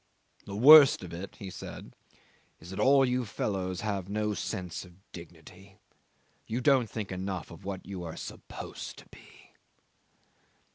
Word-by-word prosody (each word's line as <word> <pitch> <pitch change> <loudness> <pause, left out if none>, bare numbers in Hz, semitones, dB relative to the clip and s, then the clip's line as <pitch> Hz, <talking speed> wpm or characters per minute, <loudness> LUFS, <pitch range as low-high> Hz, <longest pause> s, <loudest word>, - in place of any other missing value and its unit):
"The 100 - -7
worst 140 +1 +9
of 85 -2 -8
it," 90 +3 -7
he 95 -2 -8
said, - - -9 0.6
"is 85 - -12
that 95 - -6
all 135 +4 +5
you 125 0 0
fellows 95 -4 -3
have 100 -3 -3
no 105 +1 -1
sense 90 -3 -4
of 90 -2 -15 0.2
dignity; 90 +3 -13 0.7
you 115 +3 -2
don't 130 -3 +3
think 105 -3 -5
enough 95 0 -4
of 85 - -12
what 95 -2 -5
you 95 -2 -6
are 80 -2 -7
supposed - - -8
to - - -13
be." - - -18
100 Hz, 150 wpm, -29 LUFS, 90-110 Hz, 0.7 s, worst